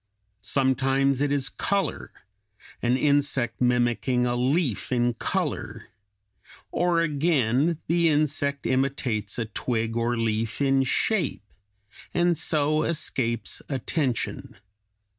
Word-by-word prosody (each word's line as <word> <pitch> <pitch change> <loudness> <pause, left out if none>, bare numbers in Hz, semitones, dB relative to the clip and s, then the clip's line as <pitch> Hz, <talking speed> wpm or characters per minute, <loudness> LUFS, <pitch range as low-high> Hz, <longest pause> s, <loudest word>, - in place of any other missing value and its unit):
Sometimes 135 +2 +1
it 145 -1 +1
is 140 -2 +1
color, 195 0 -2 0.7
an 120 +2 +2
insect 140 -4 +1
mimicking 125 0 +1
a 120 0 0
leaf 130 - 0
in 120 -1 +1
color; 115 - -3 0.8
or 175 -1 +1
again, 150 -1 +1
the 170 0 +2
insect 145 -2 +1
imitates 130 -6 -1
a 115 - -1
twig 115 +1 -2
or 120 +1 0
leaf 115 0 -1
in 135 -1 +3
shape, 170 - 0 0.7
and 175 0 +3
so 155 0 +1
escapes 120 - -1
attention. 130 -4 -2
135 Hz, 105 wpm, -25 LUFS, 120-150 Hz, 0.8 s, in